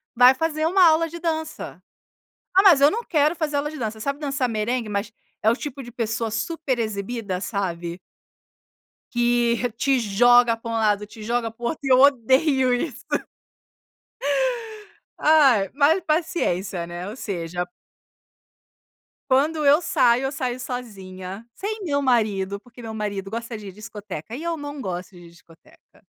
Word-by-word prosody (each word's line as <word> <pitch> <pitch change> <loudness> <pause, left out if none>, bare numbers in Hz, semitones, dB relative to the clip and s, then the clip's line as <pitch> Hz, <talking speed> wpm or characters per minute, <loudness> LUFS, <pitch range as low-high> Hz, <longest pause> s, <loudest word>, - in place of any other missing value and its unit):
"Vai 250 +2 +8
fazer 310 +2 -1
uma 370 +1 +5
aula 320 +1 +4
de 340 +1 -8
dança." 320 -2 -4 0.7
"Ah, 385 - +7
mas 350 -8 +7
eu 285 +1 +7
não 460 +6 -2
quero 305 0 +2
fazer 300 -3 -1
aula 295 +1 -1
de 310 - -9
dança." 220 -2 -4
Sabe 280 +5 -2
dançar 275 -3 -1
merengue, 225 +1 -1
mas 210 +1 -3 0.3
é 220 - +4
o 235 - +1
tipo 280 -2 -6
de 240 - -10
pessoa 225 -1 -2
super 260 +4 -2
exibida, 210 -2 -3
sabe? 175 -4 -3 1.1
Que 240 0 +1
te 270 +1 +2
joga 240 +2 +4
para 230 0 -7
um - - -3
lado, 210 -1 +1
te 215 +1 -13
joga 230 0 -1
pro 235 +2 -9
outro, 310 - -3
eu 260 -2 +4
odeio 265 0 +4
isso. 245 0 -3 2.1
Ai, 270 -11 +5
mas 300 +5 +4
paciência, 195 - -1
né, 175 +2 -6
ou 210 - -6
seja 175 -6 -4 1.6
quando 300 +4 +2
eu 290 +4 +6
saio, 245 -6 +3
eu 270 - -1
saio 255 -3 -3
sozinha 195 -5 -7
sem 425 +2 -4
meu 285 -5 0
marido, 210 -6 +1
porque 245 +2 -15
meu 225 -1 -7
marido 205 -2 -4
gosta 230 0 -5
de 205 -2 -9
discoteca 210 -2 -8
e 305 - -7
eu 335 -1 -2
não 290 -1 -6
gosto 185 -2 -5
de 175 -1 -13
discoteca. 170 -1 -22
240 Hz, 155 wpm, -23 LUFS, 210-285 Hz, 2.1 s, Vai